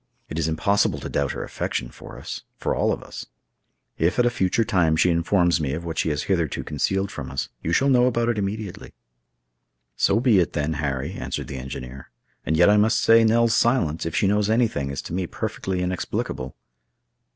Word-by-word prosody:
It 80 - -4
is 80 - 0
impossible 80 +6 +1
to - - -5
doubt - - -1
her - - -4
affection - - -3
for - - -12
us—for - - -5
all - - +1
of - - -3
us. - - -9 0.7
If 85 +4 +1
at 125 - +4
a 120 - +3
future 110 0 +1
time 85 -6 +2
she 90 - +4
informs 85 0 +2
me 70 -2 -1
of 85 +3 -5
what 80 -1 -3
she - - +1
has 75 -1 -1
hitherto 85 -5 -1
concealed 95 +7 -1
from - - -6
us, 70 +1 -3
you 80 - -2
shall 135 +10 +3
know 125 -2 +4
about 120 -1 0
it 115 -3 0
immediately." 100 0 -5 1.0
"So 100 - +2
be 120 -5 +4
it, 85 - 0
then, 75 +1 -1
Harry," 70 -2 -2
answered - - -5
the 70 - -5
engineer; 65 0 -8 0.4
"and 80 - +1
yet 85 - +6
I 105 +1 +5
must 110 +2 +3
say 115 0 +5
Nell's 115 +1 +3
silence, 115 - +2
if 85 - -4
she - - +2
knows 105 +1 +2
anything, 110 - +1
is 70 -1 -4
to - - -7
me 90 0 -1
perfectly 90 +1 -3
inexplicable." 90 -7 -3
90 Hz, 200 wpm, -23 LUFS, 80-110 Hz, 1.0 s, yet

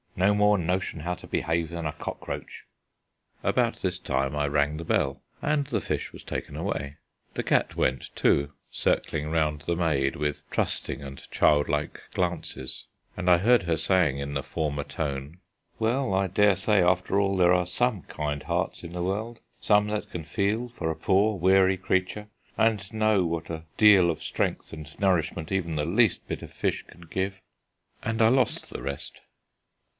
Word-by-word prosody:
No 95 +3 +3
more 105 0 +4
notion 90 -2 -1
how 90 +3 -2
to - - -13
behave 80 0 0
than 85 -1 -5
a 75 - 0
cockroach." - - -6 0.8
About - - +1
this - - -2
time 65 +1 -1
I 75 0 +1
rang 75 +1 +1
the 85 - -5
bell 70 -4 0 0.2
and 150 -1 +1
the - - 0
fish - - -3
was - - -12
taken - - -5
away. 70 +1 -3 0.4
The - - -1
cat - - +1
went 65 - -1
too, 70 +1 +2 0.2
circling 75 0 0
round 75 -2 0
the 85 +2 -1
maid 75 -6 +1
with 75 -1 -3
trusting - - -1
and 70 -1 -10
childlike 75 -1 +2
glances, 85 -7 -3 0.3
and 90 0 0
I 90 - +7
heard 115 +5 +4
her 85 -2 0
saying 80 -3 +2
in 70 +1 -4
the 70 -1 -2
former 75 -3 -2
tone: 70 +1 -4 0.4
"Well, 120 0 0
I 95 0 +2
daresay 100 +1 +3
after 90 +2 +2
all 100 -1 +1
there 90 -1 +5
are 90 0 +2
some 110 +2 0
kind 75 -2 -4
hearts - - -2
in 85 0 -8
the 90 0 -2
world, 110 +5 -3 0.2
some 105 0 +3
that 105 0 -3
can 85 - -5
feel 100 +8 -1
for 105 -9 -4
a - - -4
poor 100 +4 +2
weary 95 +1 +4
creature, 95 +3 -1 0.3
and 105 -4 +1
know 110 -3 +3
what 85 -1 -3
a 80 0 -6
deal 100 -5 +7
of 80 - -3
strength - - -2
and 80 0 -10
nourishment 85 -3 0
even 85 -4 -1
the 75 -1 0
least 105 +5 +2
bit - - -4
of - - -9
fish - - -1
can 85 - -16
give 95 +3 -3 0.3
" - - -40
And 110 +1 -1
I 110 - +7
lost 130 +2 +1
the - - -6
rest. 70 0 -6
90 Hz, 180 wpm, -27 LUFS, 75-100 Hz, 0.8 s, I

